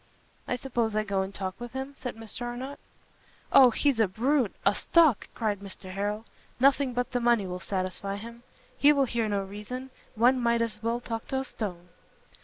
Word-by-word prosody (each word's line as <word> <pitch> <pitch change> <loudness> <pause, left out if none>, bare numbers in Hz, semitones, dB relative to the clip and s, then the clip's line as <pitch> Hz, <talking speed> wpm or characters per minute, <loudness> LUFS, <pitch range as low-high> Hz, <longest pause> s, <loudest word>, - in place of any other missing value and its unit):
"Suppose 235 -4 -1
I 215 - +2
go 200 -2 0
and 190 0 -3
talk 190 0 -5
with 240 0 -7
him?" 265 +1 -4
said 250 -3 -6
Mr 225 +1 -6
Arnott. 245 +3 -5 0.7
"O, 260 -2 +9
he's 270 0 +1
a 220 - +5
brute, 240 +4 +1
a 200 - +5
stock!" 315 -1 +3
cried 210 -4 -1
Mr 190 -1 -9
Harrel, 205 +3 -2 0.3
"nothing 270 -1 +3
but 245 0 -1
the 250 - 0
money 235 -4 +3
will 180 0 -4
satisfy 190 +1 -3
him: 230 +3 -9 0.4
he 290 - +7
will 280 -2 +3
hear 230 -3 -1
no 200 -1 0
reason; 210 +7 -7 0.2
one 245 +4 +4
might 235 -1 +3
as 215 -2 -4
well 230 +2 -1
talk 225 -2 -5
to 265 - -1
a 265 - 0
stone." 180 -8 -6
230 Hz, 190 wpm, -28 LUFS, 200-255 Hz, 0.7 s, O